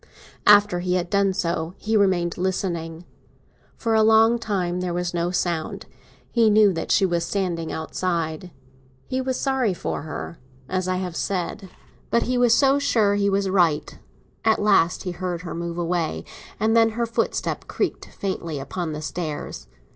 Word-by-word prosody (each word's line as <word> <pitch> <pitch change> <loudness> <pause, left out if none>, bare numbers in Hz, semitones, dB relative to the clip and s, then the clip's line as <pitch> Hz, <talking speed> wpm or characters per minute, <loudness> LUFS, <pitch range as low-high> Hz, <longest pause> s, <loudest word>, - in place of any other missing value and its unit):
After 205 -3 +6
he 180 0 0
had 175 -1 -2
done 200 -1 +3
so, 170 -2 -2
he 220 +1 -1
remained 185 -4 +2
listening. 175 -3 -3 0.7
For 225 -2 -1
a 220 - +5
long 225 +2 +5
time 180 -5 -1
there 180 -1 -2
was 175 0 -2
no 170 0 0
sound; 170 -3 -2 0.5
he 230 -2 +4
knew 210 -2 +5
that 165 - -3
she 195 - +4
was 170 -2 0
standing 170 -3 -2
outside. 165 0 -3 0.6
He 260 0 -2
was 260 -1 -2
sorry 260 -8 +1
for - - -3
her, 160 +2 -7 0.3
as 185 +2 -1
I 185 - 0
have 180 -2 -4
said; 190 +1 -3 0.4
but 235 - +2
he 250 - -1
was 245 -2 +4
so 275 0 +4
sure 220 -7 +2
he 200 0 +2
was 195 0 +1
right. 175 -6 +1 0.4
At 220 -1 +4
last 195 -4 +3
he 180 - -3
heard 175 -1 -4
her 175 - -5
move 170 0 -4
away, 170 -1 -1 0.3
and 220 +2 +2
then 225 -1 +5
her 235 - +1
footstep 230 - -2
creaked - - -2
faintly 170 -5 -4
upon 160 +4 -4
the 150 +1 -6
stairs. 155 - -5
185 Hz, 170 wpm, -23 LUFS, 170-210 Hz, 0.7 s, After